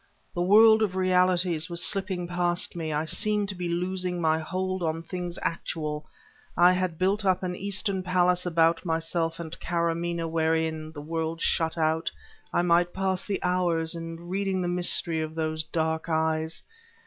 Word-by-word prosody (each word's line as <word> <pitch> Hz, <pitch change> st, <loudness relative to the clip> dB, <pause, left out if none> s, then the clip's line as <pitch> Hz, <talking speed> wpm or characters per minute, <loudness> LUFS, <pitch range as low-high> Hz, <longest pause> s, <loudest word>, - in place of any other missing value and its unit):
The 175 Hz, -, -2 dB
world 220 Hz, +4 st, +7 dB
of 200 Hz, -4 st, 0 dB
realities 180 Hz, -3 st, +2 dB
was 170 Hz, 0 st, 0 dB
slipping 190 Hz, -3 st, 0 dB
past 175 Hz, 0 st, 0 dB
me; 160 Hz, -2 st, -3 dB
I 150 Hz, +1 st, -1 dB
seemed 210 Hz, +3 st, +1 dB
to 195 Hz, -, -3 dB
be 175 Hz, -1 st, -3 dB
losing 180 Hz, +1 st, -2 dB
my 160 Hz, -1 st, +2 dB
hold 185 Hz, +3 st, -3 dB
on 165 Hz, 0 st, -2 dB
things 175 Hz, 0 st, -5 dB
actual; 155 Hz, -2 st, -3 dB, 0.5 s
I 175 Hz, +1 st, +7 dB
had 185 Hz, -2 st, -1 dB
built 195 Hz, +4 st, +1 dB
up 185 Hz, -1 st, +2 dB
an 180 Hz, -1 st, -2 dB
Eastern 200 Hz, 0 st, -1 dB
palace 180 Hz, 0 st, +2 dB
about 165 Hz, -1 st, +2 dB
myself 165 Hz, -1 st, -1 dB
and 165 Hz, -1 st, -6 dB
Karamaneh 170 Hz, 0 st, -1 dB
wherein, 160 Hz, -1 st, 0 dB
the 145 Hz, -2 st, -8 dB
world 165 Hz, +1 st, -3 dB
shut 165 Hz, 0 st, +1 dB
out, 160 Hz, 0 st, +1 dB, 0.4 s
I 175 Hz, -, +1 dB
might 175 Hz, 0 st, +3 dB
pass 190 Hz, -1 st, -1 dB
the 200 Hz, -, -2 dB
hours 175 Hz, -3 st, +1 dB
in 165 Hz, 0 st, -7 dB
reading 190 Hz, 0 st, -1 dB
the -, -, -1 dB
mystery 175 Hz, -2 st, 0 dB
of 155 Hz, 0 st, -5 dB
those 155 Hz, -1 st, -1 dB
dark 160 Hz, +1 st, -2 dB
eyes. 160 Hz, 0 st, -1 dB
175 Hz, 165 wpm, -27 LUFS, 160-185 Hz, 0.5 s, world